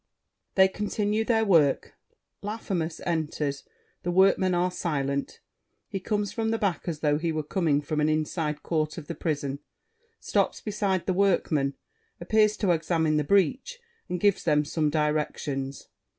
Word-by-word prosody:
[They 190 -1 +7
continue 210 +2 -1
their 220 -1 +2
work. 160 -8 +3 0.5
Laffemas 190 -6 -3
enters; 150 -4 -2 0.4
The 175 - -3
Workmen 185 0 +4
are 180 +1 +1
silent. 140 -5 -2 0.5
He 195 - -3
comes 205 +1 -1
from 225 -1 -1
the 225 - +1
back 190 -7 -1
as 160 -3 -3
though 150 -1 +2
he 165 0 -1
were 155 -1 -2
coming 150 -3 +1
from 150 +1 -1
an 150 - +2
inside 155 0 -1
court 155 -2 -1
of 160 - -7
the 170 - -5
prison; 140 -4 -2 0.6
stops - - 0
beside 200 -4 -1
The 185 - +1
Workmen, 165 -7 +1 0.4
appears 215 +4 +2
to 195 -4 +2
examine 160 -2 +1
the 150 - +2
breach, 200 - +1 0.3
and 180 - -2
gives 205 +1 +2
them 150 -2 +2
some 155 0 0
directions. 150 -3 -2
170 Hz, 150 wpm, -27 LUFS, 150-195 Hz, 0.6 s, They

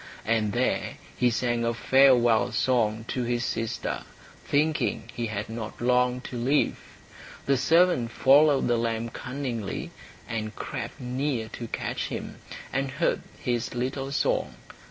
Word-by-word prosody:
And 110 -2 +1
there 125 +1 0 0.2
he 125 - +3
sang 120 0 0
a 115 0 0
farewell 125 -2 +4
song 115 -3 +1
to 130 - -1
his 120 0 -1
sister, 115 -1 -2 0.4
thinking 150 -5 0
he 120 -2 -2
had 105 -1 -4
not 110 -1 -6
long 125 +1 +2
to 125 -1 -6
live. 135 +5 +2 0.7
The 140 - +3
servant 160 -2 +3
followed 140 +3 +5
the 120 -1 +2
lamb 115 0 -1
cunningly, 125 -4 -4 0.4
and 110 -1 -4
crept - - -5
near 125 -2 -2
to 115 - -7
catch - - -3
him, - - -6 0.4
and 135 +1 0
heard - - 0 0.2
his 120 0 -2
little 135 +2 -2
song. 140 - 0
120 Hz, 135 wpm, -27 LUFS, 115-135 Hz, 0.7 s, followed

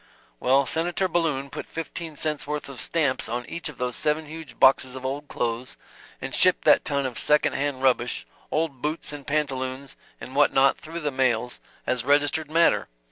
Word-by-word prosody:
"Well 135 +2 +3
Senator 175 +6 0
Balloon 150 -6 0
put - - -6
fifteen 165 0 -6
cents 150 -1 -2
worth 150 0 -3
of 135 - -7
stamps 145 -9 0
on 120 +1 -3
each 170 -2 -1
of 145 - -11
those 125 -1 -2
seven 155 +1 0
huge 160 0 -10
boxes 130 -1 +5
of 130 0 -7
old 140 +2 -3
clothes, 120 0 -3 0.4
and - - -6
shipped - - +4
that - - +5
ton 140 -1 0
of 125 -3 -4
second 150 0 +3
hand 140 -2 -2
rubbish, 125 -2 +1 0.2
old 150 -5 -1
boots 150 0 -2
and 145 -2 -9
pantaloons 135 -2 -2 0.2
and 130 - -9
what 145 - +5
not 135 0 +5
through 165 +2 -7
the 150 -2 -1
mails 125 -2 0 0.3
as 125 -2 0
registered 145 +2 +2
matter! 165 +2 +3
140 Hz, 185 wpm, -25 LUFS, 130-155 Hz, 0.4 s, boxes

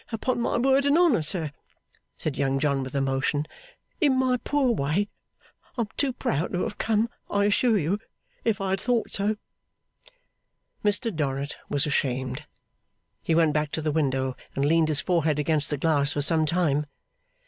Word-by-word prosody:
Upon 240 +2 -1
my - - 0
word 270 +3 +3
and 285 +3 +4
honour, 335 - +4
sir,' 155 -1 -2 0.7
said 155 -3 -3
Young 135 -1 0
John, 140 -1 +1
with 130 +1 -6
emotion, 135 +2 0 0.5
'in 285 -7 +3
my 255 -1 +2
poor 275 0 +1
way, 185 +2 0 0.7
I - - +1
am 215 - -2
too 280 -2 +1
proud 165 - -2
to 180 - 0
have - - -5
come, 220 0 +2 0.2
I 200 0 +2
assure 220 +2 +3
you, 185 +4 0 0.4
if 225 -3 +1
I 195 -1 -1
had 190 0 0
thought 240 -2 0
so.' 205 +2 0 1.5
Mr 210 0 0
Dorrit 140 -1 -2
was 145 -1 +2
ashamed. 130 -1 -1 0.8
He 165 - 0
went 160 -2 +4
back 150 0 0
to 160 - -1
the 155 - +1
window, 135 -4 0 0.2
and 135 - +1
leaned 160 +1 +3
his 150 -2 0
forehead 160 -5 +1
against 150 0 0
the 145 - -1
glass 145 -1 +2
for 145 - -1
some 155 0 +3
time. 150 -3 +1
160 Hz, 170 wpm, -26 LUFS, 145-215 Hz, 1.5 s, and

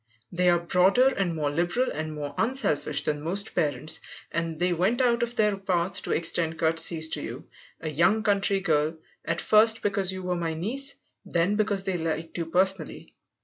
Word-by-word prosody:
They 180 0 +2
are 175 - +4
broader 185 +9 +3
and 190 -9 -1
more 150 -2 -1
liberal 175 - 0
and 155 0 -4
more 145 -1 -5
unselfish 150 - 0
than 150 -1 -1
most 195 +7 -1
parents, 145 0 0 0.3
and 165 -1 -2
they 180 +2 +1
went 190 +9 +1
out 240 -2 +2
of 235 0 -2
their 210 -3 +2
path 190 -1 -1
to - - -5
extend 165 0 0
courtesies 165 0 +1
to 160 - -2
you, - - -7 0.4
a 160 - -6
young 175 +8 +2
country 200 -2 +2
girl 155 -2 +1 0.3
at 170 0 -2
first 220 +1 +4
because 195 -2 0
you 185 0 -6
were 180 0 -1
my 165 -2 -2
niece, 260 - -2 0.3
then 175 +4 0
because 205 -2 0
they 190 -2 -1
liked 160 0 -3
you 165 - -3
personally. 185 -1 -1
180 Hz, 185 wpm, -26 LUFS, 160-200 Hz, 0.4 s, are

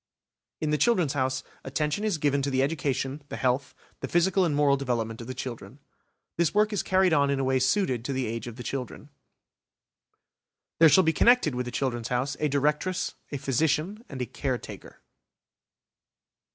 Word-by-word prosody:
In 155 -1 -1
the 150 - +1
"Children's 180 - +2
House" 130 -1 -1 0.2
attention 150 +8 -2
is 210 -6 0
given 140 -2 +1
to 140 - -1
the 130 -1 +1
education, 140 -1 -2
the - - -5
health, 130 +2 -1 0.2
the - - -4
physical 185 +2 +2
and 155 -4 0
moral 145 -1 +4
development 120 -4 -2
of 115 - -9
the 130 - -5
children. 120 -3 -7 0.6
This 170 +2 +1
work 210 +1 +3
is 205 - 0
carried 185 -2 +2
on 140 -2 +3
in 140 -1 0
a - - 0
way 130 0 +2
suited 130 - +1
to 140 - -2
the 130 -1 -1
age 115 +1 -4
of 120 - -7
the 120 - -8
children. 135 +3 -5 1.7
There 165 -1 +8
shall 185 +6 +6
be 160 - +2
connected 235 - +4
with 125 0 -3
the - - -4
"Children's 120 -3 -2
House" 130 +3 -1
a 150 - +1
Directress, 150 +6 0 0.2
a 145 - -2
Physician, 155 - 0
and 135 - -7
a - - -2
Caretaker. 130 +1 -6
140 Hz, 180 wpm, -27 LUFS, 130-160 Hz, 1.7 s, There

